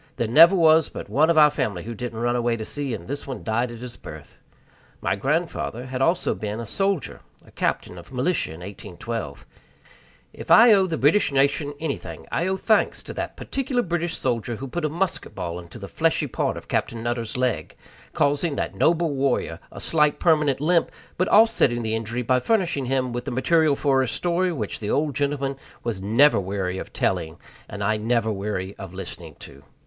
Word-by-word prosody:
There 115 Hz, -, -1 dB
never 165 Hz, -, +7 dB
was 160 Hz, -2 st, +5 dB
but -, -, -8 dB
one 155 Hz, +4 st, +3 dB
of 170 Hz, -, +3 dB
our 150 Hz, -1 st, +7 dB
family 100 Hz, -10 st, -2 dB
who 115 Hz, -, -6 dB
didn't 115 Hz, 0 st, -6 dB
run 120 Hz, +1 st, 0 dB
away 120 Hz, -1 st, 0 dB
to 110 Hz, -, -5 dB
sea, 140 Hz, -2 st, -2 dB
and -, -, -10 dB
this 140 Hz, +3 st, -5 dB
one 135 Hz, -, -6 dB
died 120 Hz, +3 st, 0 dB
at 120 Hz, -1 st, -9 dB
his 125 Hz, -1 st, -7 dB
birth. 75 Hz, -3 st, -11 dB, 0.6 s
My -, -, 0 dB
grandfather 140 Hz, -, -2 dB
had 130 Hz, 0 st, -4 dB
also 170 Hz, +6 st, +2 dB
been 105 Hz, +1 st, -5 dB
a 115 Hz, -, -5 dB
soldier 195 Hz, -, -2 dB, 0.2 s
a -, -, -18 dB
captain 90 Hz, -, -2 dB
of 85 Hz, -, -14 dB
militia 135 Hz, +8 st, 0 dB
in 80 Hz, +2 st, -9 dB
1812. 100 Hz, -3 st, -7 dB, 0.9 s
If -, -, -10 dB
I 230 Hz, 0 st, +8 dB
owe 190 Hz, -2 st, +4 dB
the 165 Hz, -3 st, -2 dB
British 150 Hz, +6 st, +3 dB
nation 140 Hz, +1 st, +1 dB
anything, 155 Hz, -3 st, -5 dB
I 170 Hz, -, 0 dB
owe 190 Hz, 0 st, 0 dB
thanks 215 Hz, +3 st, +1 dB
to -, -, -8 dB
that -, -, -5 dB
particular 265 Hz, -2 st, -2 dB
British 170 Hz, -1 st, -2 dB
soldier 120 Hz, -2 st, -1 dB
who 135 Hz, +5 st, -6 dB
put 170 Hz, +5 st, -3 dB
a -, -, 0 dB
musket 175 Hz, +3 st, -2 dB
ball 90 Hz, -2 st, -4 dB
into 85 Hz, -1 st, -11 dB
the -, -, -8 dB
fleshy -, -, +1 dB
part -, -, -2 dB
of -, -, -10 dB
Captain 115 Hz, -1 st, -2 dB
Nutter's 120 Hz, 0 st, -3 dB
leg, 125 Hz, -11 st, -1 dB, 0.4 s
causing 145 Hz, +2 st, +1 dB
that -, -, -2 dB
noble 165 Hz, -1 st, +2 dB
warrior 135 Hz, -2 st, -1 dB
a -, -, -9 dB
slight 150 Hz, -2 st, +2 dB
permanent 150 Hz, -5 st, +3 dB
limp, 165 Hz, +3 st, +2 dB, 0.3 s
but 185 Hz, -, 0 dB
offsetting 205 Hz, -, +4 dB
the 110 Hz, 0 st, -2 dB
injury 115 Hz, +2 st, -2 dB
by 125 Hz, +2 st, +2 dB
furnishing 175 Hz, -, 0 dB
him 130 Hz, -1 st, -1 dB
with 120 Hz, -, -4 dB
the -, -, -3 dB
material 150 Hz, +4 st, +2 dB
for 135 Hz, -2 st, +2 dB
a 130 Hz, -, 0 dB
story 175 Hz, +7 st, 0 dB
which 115 Hz, -, -4 dB
the 105 Hz, -, -4 dB
old 150 Hz, 0 st, +1 dB
gentleman 140 Hz, -1 st, -1 dB, 0.3 s
was 115 Hz, -5 st, -3 dB
never 115 Hz, +7 st, +4 dB
weary 95 Hz, -1 st, -3 dB
of -, -, -8 dB
telling 80 Hz, 0 st, -1 dB, 0.3 s
and 100 Hz, 0 st, -5 dB
I 110 Hz, +2 st, +1 dB
never 110 Hz, 0 st, 0 dB
weary 100 Hz, -1 st, -4 dB
of 95 Hz, -2 st, -9 dB
listening 85 Hz, -4 st, -8 dB
to. 70 Hz, +1 st, -12 dB
130 Hz, 200 wpm, -24 LUFS, 110-160 Hz, 0.9 s, I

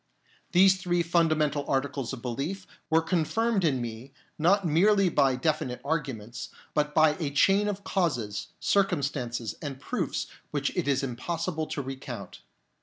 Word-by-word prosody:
These 190 Hz, +1 st, +5 dB
three 175 Hz, -1 st, +1 dB
fundamental 155 Hz, -4 st, +2 dB
articles 135 Hz, -2 st, -1 dB
of 130 Hz, -3 st, -7 dB
belief 145 Hz, +11 st, -3 dB, 0.2 s
were 160 Hz, +1 st, +4 dB
confirmed 195 Hz, +6 st, +1 dB
in 140 Hz, -6 st, +2 dB
me, 120 Hz, +3 st, -6 dB, 0.3 s
not 190 Hz, +5 st, +3 dB
merely 190 Hz, +4 st, +4 dB
by 135 Hz, -5 st, +3 dB
definite 130 Hz, -2 st, -1 dB
arguments, 130 Hz, -7 st, -3 dB, 0.2 s
but 150 Hz, 0 st, 0 dB
by 155 Hz, -1 st, +6 dB
a 155 Hz, -4 st, -1 dB
chain 195 Hz, +8 st, +3 dB
of 200 Hz, -1 st, -3 dB
causes, 120 Hz, -, -1 dB
circumstances, 140 Hz, -, 0 dB
and 140 Hz, -3 st, -5 dB
proofs -, -, -2 dB, 0.2 s
which -, -, -2 dB
it -, -, -1 dB
is 140 Hz, -1 st, +2 dB
impossible 160 Hz, +5 st, -3 dB
to 140 Hz, -, -3 dB
recount. 130 Hz, -, -7 dB
150 Hz, 140 wpm, -28 LUFS, 130-175 Hz, 0.3 s, by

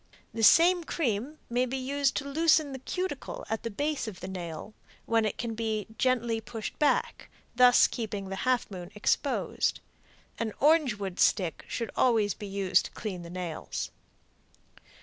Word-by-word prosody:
The 225 Hz, -, -3 dB
same 345 Hz, +9 st, +6 dB
cream 275 Hz, -2 st, -2 dB
may 245 Hz, +2 st, +1 dB
be 265 Hz, +2 st, -3 dB
used 275 Hz, +1 st, 0 dB
to 280 Hz, -, -3 dB
loosen 310 Hz, 0 st, +3 dB
the 265 Hz, -, -6 dB
cuticle 375 Hz, -, -4 dB
at 220 Hz, -, -1 dB
the 230 Hz, -, -4 dB
base 290 Hz, +5 st, -2 dB
of 195 Hz, -4 st, -7 dB
the 185 Hz, -, -6 dB
nail, 180 Hz, +1 st, -6 dB, 0.3 s
when 225 Hz, -1 st, +2 dB
it 215 Hz, -, -2 dB
can 235 Hz, -1 st, -3 dB
be 220 Hz, -2 st, -2 dB
gently 235 Hz, -2 st, +1 dB
pushed 225 Hz, -1 st, -7 dB
back, 295 Hz, -, +1 dB, 0.3 s
thus 250 Hz, 0 st, +7 dB
keeping 205 Hz, -4 st, -4 dB
the 195 Hz, -, -4 dB
half 255 Hz, 0 st, 0 dB
moon 180 Hz, -2 st, -7 dB
exposed. 210 Hz, -, 0 dB, 0.6 s
An 220 Hz, -2 st, -2 dB
orange 300 Hz, -5 st, +4 dB
wood 195 Hz, -3 st, -5 dB
stick 180 Hz, -6 st, +2 dB
should 230 Hz, -2 st, -3 dB
always 220 Hz, -5 st, +3 dB
be 205 Hz, -, -8 dB
used 195 Hz, -1 st, +2 dB
to -, -, -8 dB
clean 190 Hz, -5 st, -5 dB
the 170 Hz, -, -9 dB
nails. 175 Hz, -2 st, -5 dB
230 Hz, 165 wpm, -29 LUFS, 200-270 Hz, 0.6 s, thus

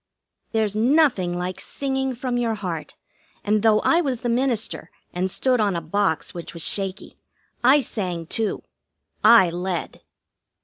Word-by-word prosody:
There's 215 Hz, -2 st, 0 dB
nothing 230 Hz, -, +2 dB
like 180 Hz, +1 st, -4 dB
singing 265 Hz, -1 st, -2 dB
from 250 Hz, 0 st, -3 dB
your 230 Hz, -2 st, 0 dB
heart, 180 Hz, -6 st, -5 dB, 0.5 s
and, 210 Hz, 0 st, +1 dB
though 215 Hz, -1 st, +4 dB
I 335 Hz, -, +3 dB
was 265 Hz, -7 st, -2 dB
the 240 Hz, -, -2 dB
minister 235 Hz, -2 st, -1 dB, 0.2 s
and 185 Hz, +2 st, -1 dB
stood 250 Hz, +5 st, +1 dB
on 205 Hz, -4 st, +1 dB
a -, -, 0 dB
box 170 Hz, +1 st, -1 dB
which 170 Hz, 0 st, -8 dB
was 165 Hz, -, -5 dB
shaky, 195 Hz, 0 st, -4 dB, 0.5 s
I 270 Hz, +4 st, +6 dB
sang, 180 Hz, -9 st, -4 dB
too. 220 Hz, +5 st, -2 dB, 0.6 s
I 190 Hz, -7 st, +7 dB
led. 175 Hz, 0 st, -4 dB
215 Hz, 145 wpm, -23 LUFS, 180-245 Hz, 0.6 s, I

